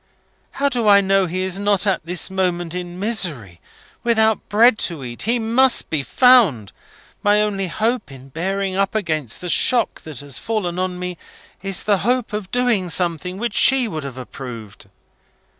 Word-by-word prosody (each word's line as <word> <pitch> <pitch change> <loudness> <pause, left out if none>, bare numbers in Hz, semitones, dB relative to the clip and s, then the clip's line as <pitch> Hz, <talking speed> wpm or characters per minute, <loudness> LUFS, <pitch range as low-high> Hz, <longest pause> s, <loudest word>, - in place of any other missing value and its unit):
How 280 - 0
do 245 -5 0
I 200 -1 +7
know 195 -1 +2
he 185 +2 -3
is 190 +1 -2
not 205 -1 +1
at 195 -5 0
this 180 +3 -3
moment 175 -3 -1
in 180 -1 -6
misery, 160 - -2 0.4
without 220 -2 +1
bread 220 +2 +4
to 160 -6 -8
eat? 120 -1 -7
He 235 +3 +1
must 240 +3 +2
be 155 -3 0
found! 195 - +4 0.5
My 205 0 +3
only 200 -2 -1
hope 225 - -1
of 135 0 -13
bearing 190 +3 -2
up 195 +2 0
against 155 - -2
the 180 - -5
shock 235 +5 +1
that 150 -5 -8
has 140 -3 -6
fallen 185 -6 -2
on 185 -1 -2
me, 180 -1 -5 0.4
is 195 -1 -2
the 205 -2 +2
hope 240 +4 0
of 210 -3 -4
doing 240 -7 +1
something 175 +1 -1
which 235 +3 -3
she 260 -2 +4
would 155 -7 -5
have 135 -2 -7
approved. 115 -6 -9
190 Hz, 175 wpm, -20 LUFS, 165-220 Hz, 0.5 s, I